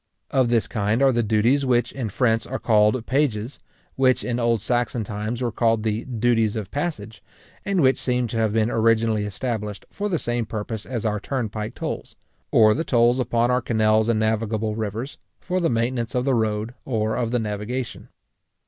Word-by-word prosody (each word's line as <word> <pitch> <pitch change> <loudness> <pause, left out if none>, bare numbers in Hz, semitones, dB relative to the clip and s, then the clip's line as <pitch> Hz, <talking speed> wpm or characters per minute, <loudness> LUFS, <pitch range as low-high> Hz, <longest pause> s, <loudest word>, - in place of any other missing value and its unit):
Of 130 -3 +2
this 115 -4 +2
kind 110 +3 0
are 135 - +6
the 120 -1 +1
duties, 115 +6 +2
which, 120 -3 +1
in 125 -5 -4
French, 115 +1 +1
are 130 - -3
called 110 +1 +2
peages, 130 -3 -1 0.4
which 130 -1 +3
in 125 -1 -2
old 115 -1 +2
Saxon 120 +1 -1
times 110 +4 -4
were 120 - 0
called 115 -1 +1
the 110 +1 -1
duties 115 -3 +1
of 105 -4 -5
passage, 145 -8 -4 0.4
and 200 -3 +1
which 130 -1 +3
seem 125 -1 0
to 115 - -3
have 110 -2 +1
been 110 +2 +1
originally 115 -1 +2
established 105 -1 -4
for 205 +1 -3
the 175 - +1
same 120 -4 -2
purpose 110 0 -5
as 120 -3 -3
our 105 -1 0
turnpike 110 -2 -4
tolls, - - -5 0.3
or 110 -1 +5
the 160 - -1
tolls 120 -2 +3
upon 120 -1 +1
our 125 +1 +2
canals 110 -1 +2
and 115 -2 +2
navigable 110 0 0
rivers, 110 +5 -4 0.2
for 185 0 -2
the 170 - +1
maintenance 120 +1 -1
of 125 0 +1
the 135 - +2
road 110 0 -1
or 110 -3 -1
of 120 -2 -1
the 125 - +1
navigation. 110 +3 -4
115 Hz, 185 wpm, -23 LUFS, 110-125 Hz, 0.4 s, are